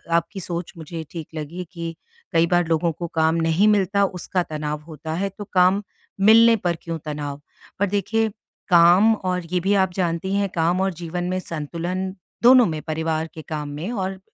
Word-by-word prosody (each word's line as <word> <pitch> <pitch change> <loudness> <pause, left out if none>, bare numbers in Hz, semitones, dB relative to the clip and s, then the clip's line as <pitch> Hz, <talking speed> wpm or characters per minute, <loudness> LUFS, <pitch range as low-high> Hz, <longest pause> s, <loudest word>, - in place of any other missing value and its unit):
आपकी 170 +4 -1
सोच 170 -1 -5
मुझे 165 0 -6
ठीक 165 -3 -6
लगी 160 +4 -5
कि 165 -1 -5 0.4
कई 165 0 +4
बार 175 -1 +2
लोगों 165 +1 +1
को 170 +2 -5
काम 160 0 +3
नहीं 165 +4 +3
मिलता 200 -1 +3
उसका 185 -1 -2
तनाव 150 -2 -4
होता 160 0 -6
है 195 +4 -1
तो 205 - -5
काम 185 +2 +4 0.5
मिलने 230 +1 +7
पर 175 -5 -1
क्यों 165 -1 -4
तनाव? 145 -1 -5 0.4
पर 200 - +3
देखिए 215 +3 0 0.4
काम 180 +5 +6
और 180 -3 -2
ये 180 - +2
भी 195 +3 +1
आप 185 -1 -3
जानती 180 +1 -1
हैं 200 0 +1
काम 170 +2 +2
और 190 -1 0
जीवन 175 +1 -4
में 185 0 -1
संतुलन 170 +3 -4 0.3
दोनों 250 0 +8
में 155 -4 -3
परिवार 160 0 -2
के 160 - -8
काम 150 -2 -4
में 155 +9 -5
और 190 -4 -3
175 Hz, 185 wpm, -22 LUFS, 160-190 Hz, 0.5 s, दोनों